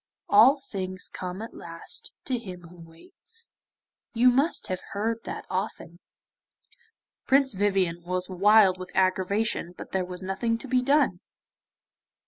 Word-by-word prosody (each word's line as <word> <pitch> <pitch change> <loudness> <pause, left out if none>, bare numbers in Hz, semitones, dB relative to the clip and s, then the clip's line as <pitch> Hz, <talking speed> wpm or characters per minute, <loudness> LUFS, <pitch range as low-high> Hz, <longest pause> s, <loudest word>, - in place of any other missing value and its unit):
"All 230 +8 +7
things 185 -8 -5
come 185 +3 -5
at 225 - -9
last 165 0 -4
to 255 -3 -1
him 185 -5 -9
who 175 +1 -14
waits;" 450 - -8 0.7
you 250 +2 +6
must 275 +7 +1
have 185 0 -3
heard 225 +3 -2
that - - -6
often.' 185 -2 -4 1.3
Prince 270 -1 +4
Vivien 190 -4 +1
was 180 +1 -2
wild 195 0 +5
with 185 - -7
aggravation, 190 0 +1
but - - -9
there 190 -1 0
was 180 +1 -8
nothing 230 +5 -1
to 250 - -8
be 255 0 +2
done. 275 -8 +2
195 Hz, 135 wpm, -27 LUFS, 185-235 Hz, 1.3 s, All